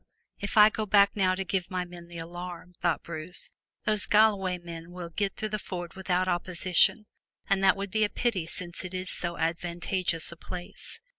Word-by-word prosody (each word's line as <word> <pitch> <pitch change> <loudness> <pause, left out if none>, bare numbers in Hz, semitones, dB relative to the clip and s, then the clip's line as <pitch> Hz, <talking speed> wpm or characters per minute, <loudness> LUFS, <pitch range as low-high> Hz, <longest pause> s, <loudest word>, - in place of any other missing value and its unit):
"If 200 +2 -3
I 210 0 +9
go 215 0 -2
back 200 0 +5
now 185 -2 +3
to 195 - -2
give 185 -1 -1
my 180 -1 -2
men 175 -1 -11
the 170 0 -9
alarm," 175 +1 -7
thought 170 -2 +1
Bruce, 170 +1 -5 0.3
"those 215 -2 +2
Galloway 205 -4 +4
men 170 -1 -9
will 175 -1 -7
get 195 +2 -1
through 215 - -3
the 215 0 -2
ford 175 -3 -6
without 185 -1 0
opposition, 185 +3 +3 0.4
and 195 -1 +2
that 195 +1 +6
would 200 -1 -4
be 215 +1 +2
a 210 - +2
pity 200 -10 0
since 175 -1 -7
it 185 0 -6
is 185 0 -4
so 170 -1 -3
advantageous 170 +1 -1
a - - -8
place." 180 - -8
180 Hz, 195 wpm, -29 LUFS, 175-200 Hz, 0.4 s, I